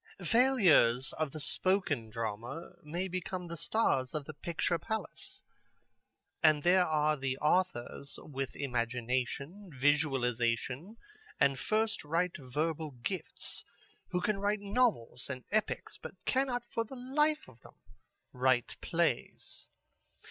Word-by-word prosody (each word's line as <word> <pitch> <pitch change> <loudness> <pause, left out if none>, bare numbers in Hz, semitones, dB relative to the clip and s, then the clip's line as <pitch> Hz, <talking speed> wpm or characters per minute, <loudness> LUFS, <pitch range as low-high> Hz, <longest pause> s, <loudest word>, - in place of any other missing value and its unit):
"Failures 190 - +5
of 155 -2 +1
the 155 - -6
spoken 150 - +1
drama 115 - -4
may 170 +5 -3
become 185 0 -3
the 170 0 -5
stars 165 - +1
of 150 -2 -2
the 155 - -7
picture 170 +3 -1
palace. 220 +6 -4 1.0
And 155 -2 +5
there 180 +1 +5
are 155 -1 +3
the 135 -2 -2
authors 150 -4 0
with 135 -2 -4
imagination, 125 - -2
visualization 135 - +1 0.4
and 140 -1 +4
first 220 +4 +1
rate 170 +4 0
verbal 150 +3 -2
gifts 185 +7 -2 0.5
who 180 -1 0
can 205 +1 0
write 205 +1 +1
novels 200 - +1
and 130 -2 -5
epics, 215 0 -1
but - - -8
cannot 255 -2 +1
for 230 - -1
the 230 +4 -10
life 300 +5 +1
of 125 -2 -17
them - - -16 0.6
write 130 -1 +2
plays. - - -1
155 Hz, 120 wpm, -32 LUFS, 130-195 Hz, 1.0 s, Failures